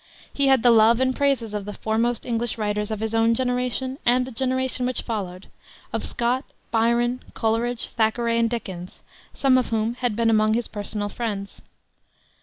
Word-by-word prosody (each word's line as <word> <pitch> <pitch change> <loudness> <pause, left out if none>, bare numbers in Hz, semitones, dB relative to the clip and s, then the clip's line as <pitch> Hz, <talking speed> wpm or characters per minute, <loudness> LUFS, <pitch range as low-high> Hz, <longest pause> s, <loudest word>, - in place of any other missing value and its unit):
He 280 -1 +1
had 265 -3 +4
the 245 - +7
love 225 +1 +5
and 260 0 +1
praises 265 -6 0
of 205 -2 -3
the 210 - -6
foremost 230 +2 -1
English 235 -1 -2
writers 210 -1 -1
of 215 -1 -4
his 220 0 -2
own 225 0 +3
generation 250 +2 -1
and 250 +1 +3
the 260 - -8
generation 255 +1 +1
which 255 - -1
followed 195 -5 -4 0.5
of - - -2
Scott, 245 +2 0 0.3
Byron, 235 +2 +1
Coleridge, 230 +1 0
Thackeray, 230 +1 +1
and 230 0 +2
Dickens, 190 -6 -6 0.3
some 260 -2 +4
of 250 - -2
whom 225 0 0
had 245 -3 -2
been 230 0 +2
among 215 0 +3
his 240 0 -1
personal 205 0 -3
friends. 205 -4 -5
230 Hz, 175 wpm, -24 LUFS, 220-250 Hz, 0.5 s, the